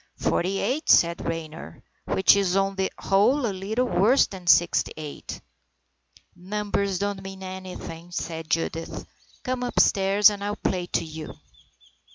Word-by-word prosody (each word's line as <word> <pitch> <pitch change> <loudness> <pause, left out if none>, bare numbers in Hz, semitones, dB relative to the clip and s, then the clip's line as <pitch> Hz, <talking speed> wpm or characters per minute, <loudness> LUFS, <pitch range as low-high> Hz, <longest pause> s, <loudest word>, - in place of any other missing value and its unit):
Forty 190 +3 0
eight," 260 +11 -2
said 170 0 +4
Raynor, 165 -1 -6
" - - -42
which 190 - +5
is 195 -2 +1
on 195 0 +1
the 190 0 -1
whole 240 +8 +2
a 210 - -1
little 210 +6 -1
worse 245 +3 +4
than 185 -3 -11
sixty 175 -1 +4
eight." 150 -2 -7 1.0
"Numbers 200 +1 -2
don't 200 0 -2
mean 190 0 -9
anything," 185 -2 -8
said 165 -2 -5
Judith. 165 0 -2 0.2
" - - -30
Come 255 0 -2
upstairs 205 -4 +4
and 200 -1 -6
I'll 205 0 -2
play 180 -4 -2
to - - -1
you." 155 -1 -8
190 Hz, 150 wpm, -25 LUFS, 175-205 Hz, 1.0 s, which